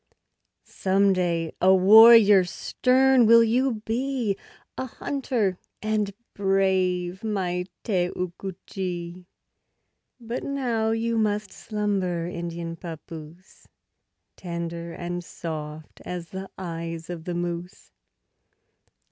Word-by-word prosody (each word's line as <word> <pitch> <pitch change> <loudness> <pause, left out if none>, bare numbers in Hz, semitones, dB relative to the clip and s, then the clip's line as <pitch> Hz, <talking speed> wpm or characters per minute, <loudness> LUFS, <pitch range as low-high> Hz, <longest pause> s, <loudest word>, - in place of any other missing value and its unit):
Some 195 +1 +2
day 170 -3 -1
a 190 +1 +6
warrior 210 +1 +8
stern 255 +6 +3
will 230 +1 +8
you 230 -1 +1
be, 240 -2 -1 0.4
A 260 - -4
hunter 235 -8 -2 0.2
and 215 -2 -1 0.2
brave, 190 -2 0
my 180 -4 -1 0.2
Te 180 -5 +1
oo 180 -1 -3
ku 195 -1 -6
che; 175 -1 -5 0.9
But 235 +1 -5
now 240 -6 -1
must 220 -2 0
you - - -13
slumber, 195 -5 -2
Indian 170 -1 -5
papoose, 165 +1 -10 0.7
Tender 170 -1 -5
and 175 +1 -5
soft 155 -2 -7
as 175 -2 -6
the 190 0 -7
eyes 165 -2 -5
of 165 -2 -7
the 175 - -3
moose. 175 +1 -5
190 Hz, 105 wpm, -25 LUFS, 175-220 Hz, 0.9 s, warrior